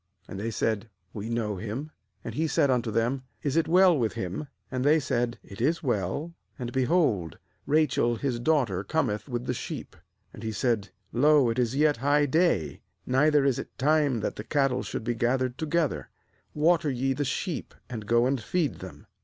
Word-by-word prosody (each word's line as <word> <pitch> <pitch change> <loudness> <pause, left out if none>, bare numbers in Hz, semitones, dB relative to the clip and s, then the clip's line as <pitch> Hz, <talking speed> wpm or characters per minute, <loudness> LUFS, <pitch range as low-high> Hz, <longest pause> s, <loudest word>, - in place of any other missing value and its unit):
And 95 - -7
they 110 +3 -2
said: 110 0 -1 0.2
'We 105 +1 -5
know 110 -4 -1
him.' 115 +10 -5 0.3
6And - - -4
he 160 +2 0
said 145 -3 +2
unto 120 -2 +1
them: 115 +5 0 0.2
'Is 140 -2 -1
it 165 -1 +2
well 180 +1 +6
with 115 -7 0
him?' 95 +11 -4 0.2
And 130 -1 -1
they 150 +3 +5
said: 120 -4 -1
'It 100 +2 -10
is 160 +7 +1
well; 120 - -1 0.2
and, 120 -3 -4
be 130 -1 +2
hold, 120 - +1 0.3
Rachel 150 -6 +2
his 125 0 -2
daughter 120 -9 +1
cometh 110 -2 -1
with 120 0 -3
the 125 - -1
sheep.' - - -6 0.4
7Andhesaid: 110 -1 -1 0.2
'Lo, 140 0 +5
it 115 - -2
is 125 0 +1
yet 150 +1 +3
high 145 +4 +3
day, 150 - +1 0.2
neither 145 +2 +3
is 135 -3 +2
it - - -8
time 145 -4 +2
that - - -3
the - - -5
cattle 135 -4 +1
should - - -5
be 120 - 0
gathered 125 +2 0
together; 160 -1 -1 0.5
water 160 +1 +3
ye 135 0 0
the 145 +2 -1
sheep, 160 +3 -3
and 110 -4 -7
go 120 +2 +4
and 130 -1 0
feed 155 +6 -1
them.' - - -10
130 Hz, 185 wpm, -27 LUFS, 115-150 Hz, 0.5 s, well